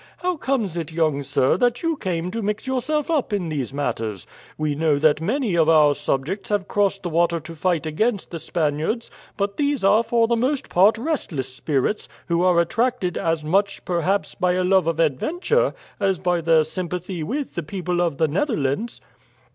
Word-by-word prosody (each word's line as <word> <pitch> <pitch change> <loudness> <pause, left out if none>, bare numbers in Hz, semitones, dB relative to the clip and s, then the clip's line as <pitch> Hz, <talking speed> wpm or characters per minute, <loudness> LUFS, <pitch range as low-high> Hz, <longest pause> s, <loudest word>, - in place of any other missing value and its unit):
How 365 0 -1
comes 255 - -1
it, 165 -2 -4
young 155 -3 +1
sir, 135 +1 +2
that 245 - +1
you 330 -1 +1
came 180 - -3
to 230 - -3
mix 210 +2 -2
yourself 265 +4 -1
up 295 -9 0
in 190 -5 -1
these 140 -5 -3
matters? 115 -8 -3 0.3
We 155 -1 0
know 150 0 +2
that 150 +1 +3
many 225 - 0
of 165 -1 +3
our 150 -2 +6
subjects 155 +9 -2
have 205 -2 0
crossed 200 -1 0
the 175 - -2
water 170 +1 +2
to 165 +2 -10
fight 165 -2 0
against 200 +7 -1
the 165 - -5
Spaniards; 160 +9 -1 0.3
but 200 0 -2
these 285 -5 0
are 205 +3 +5
for 230 0 +2
the 235 - +2
most 260 +4 -1
part 200 +6 +4
restless 185 - -3
spirits, 145 +9 -1 0.2
who 170 0 +2
are 180 -1 +4
attracted 225 0 0
as 165 -1 -1
much, 195 +6 0
perhaps, 180 +3 0
by 180 0 +1
a 185 0 +1
love 185 -2 +3
of 165 -1 -1
adventure 350 - +1 0.2
as 195 -2 +1
by 175 -1 0
their 160 -1 +4
sympathy 180 +2 -4
with 265 - -3
the 170 - -2
people 175 +2 -2
of 170 -5 0
the 160 - +2
Netherlands." 185 - -1
180 Hz, 185 wpm, -22 LUFS, 160-225 Hz, 0.3 s, our